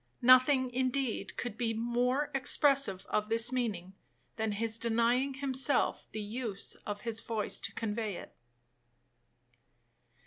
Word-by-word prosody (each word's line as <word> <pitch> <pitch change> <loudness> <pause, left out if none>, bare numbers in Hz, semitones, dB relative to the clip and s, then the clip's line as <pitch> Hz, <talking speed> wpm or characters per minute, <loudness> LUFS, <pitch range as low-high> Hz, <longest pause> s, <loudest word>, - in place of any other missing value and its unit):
Nothing, 255 +1 +5
indeed, 255 -1 -1
could 235 -3 -5
be 225 -2 0
more 245 +5 0
expressive 270 -6 +3
of 210 0 -1
this 230 +2 +2
meaning, 200 -8 -2 0.4
than 220 -2 -2
his 225 +2 0
denying 235 +4 +1
himself 270 0 0
the 215 0 -5
use 215 -2 -4
of 205 -1 -4
his 230 -2 -3
voice 225 -2 -2
to - - -3
convey 215 -2 -3
it. - - -10
235 Hz, 125 wpm, -31 LUFS, 220-255 Hz, 0.4 s, Nothing